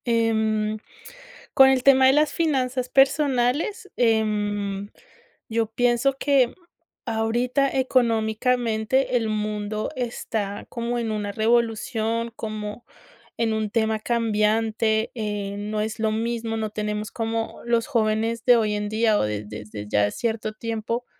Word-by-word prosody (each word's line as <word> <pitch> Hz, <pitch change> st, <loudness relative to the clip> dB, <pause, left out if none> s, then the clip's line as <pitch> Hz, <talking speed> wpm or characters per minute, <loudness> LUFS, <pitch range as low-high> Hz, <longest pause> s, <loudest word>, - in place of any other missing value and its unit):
Em, 220 Hz, -2 st, +1 dB, 0.7 s
con 265 Hz, 0 st, +7 dB
el 260 Hz, -1 st, +2 dB
tema 265 Hz, -1 st, +6 dB
de 265 Hz, -, +5 dB
las 300 Hz, +1 st, +2 dB
finanzas 260 Hz, -5 st, 0 dB
personales, 280 Hz, -, +2 dB
em, 205 Hz, -3 st, 0 dB, 0.6 s
yo 225 Hz, 0 st, 0 dB
pienso 245 Hz, +4 st, +1 dB
que 270 Hz, -4 st, +2 dB, 0.5 s
ahorita 240 Hz, +4 st, +1 dB
económicamente 235 Hz, 0 st, +1 dB
el 225 Hz, -2 st, -1 dB
mundo 210 Hz, 0 st, -2 dB
está 220 Hz, -4 st, -3 dB
como 235 Hz, 0 st, -3 dB
en 230 Hz, -2 st, -2 dB
una 205 Hz, -1 st, -3 dB
revolución, 230 Hz, 0 st, 0 dB
como 215 Hz, +1 st, -6 dB, 0.5 s
en 225 Hz, -1 st, +1 dB
un 215 Hz, -1 st, -1 dB
tema 220 Hz, -1 st, +1 dB
cambiante, 220 Hz, -1 st, +1 dB
eh, 210 Hz, -3 st, -3 dB
no 210 Hz, +1 st, -3 dB
es 215 Hz, 0 st, -4 dB
lo 220 Hz, 0 st, +1 dB
mismo, 225 Hz, 0 st, -2 dB
no 220 Hz, -1 st, -2 dB
tenemos 210 Hz, 0 st, -3 dB
como 225 Hz, 0 st, -3 dB
los 235 Hz, -1 st, +1 dB
jóvenes 225 Hz, 0 st, 0 dB
de 245 Hz, -, +7 dB
hoy 215 Hz, -2 st, +1 dB
en 205 Hz, 0 st, -3 dB
día, 220 Hz, 0 st, +2 dB
o -, -, +1 dB
de 105 Hz, 0 st, -3 dB
de 105 Hz, +1 st, -8 dB
desde 105 Hz, -1 st, -8 dB
ya 105 Hz, 0 st, +2 dB
cierto 220 Hz, -2 st, -2 dB
tiempo, 230 Hz, +2 st, -3 dB
225 Hz, 135 wpm, -24 LUFS, 215-240 Hz, 0.7 s, con